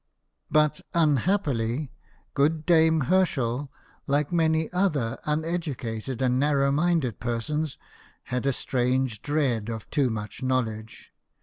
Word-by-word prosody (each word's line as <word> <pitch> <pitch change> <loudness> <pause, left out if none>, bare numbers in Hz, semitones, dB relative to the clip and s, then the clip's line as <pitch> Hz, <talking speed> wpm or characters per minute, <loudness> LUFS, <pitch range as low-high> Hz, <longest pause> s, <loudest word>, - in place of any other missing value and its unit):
But, 150 0 +2
unhappily, 145 - +1 0.4
good 150 +2 +1
clame 160 -4 +4
Herschel, 140 -6 +1 0.4
like 145 +2 +1
many 160 -2 +2
other 150 -11 0
uneducated 145 -7 -2
and 125 0 +2
narrow 140 -1 +2
minded 150 -5 +1
persons, 130 +6 -2 0.5
had 125 +2 -2
a - - +4
strange 125 -3 0
dread 130 -7 0
of 110 -2 -5
too 140 -4 +2
much 105 -3 -5
knowledge. 115 -4 -2
140 Hz, 110 wpm, -26 LUFS, 120-155 Hz, 0.5 s, clame